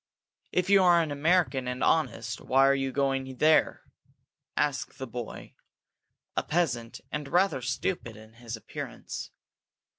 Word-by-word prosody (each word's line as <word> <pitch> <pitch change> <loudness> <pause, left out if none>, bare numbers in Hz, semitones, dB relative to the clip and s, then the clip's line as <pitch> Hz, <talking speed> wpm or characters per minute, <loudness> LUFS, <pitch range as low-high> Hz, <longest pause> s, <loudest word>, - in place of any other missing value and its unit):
"If 180 0 +1
you 200 -1 +7
are 175 -2 +6
an 155 - -4
American 145 -3 +2
and 125 0 -2
honest, 115 -8 0
why 135 +1 +4
are 140 - +5
you 135 -1 -1
going 135 -1 -1
there?" 155 +3 +3 0.7
asked 145 -2 -1
this 130 -1 -5
boy, 120 0 -7 0.8
a - - +2
peasant, 125 -9 -1
and 150 -1 -3
rather 180 -4 +2
stupid 120 - -3
in 110 +1 -15
his 115 0 -7
appearance. 110 - -7
135 Hz, 140 wpm, -28 LUFS, 120-160 Hz, 0.8 s, you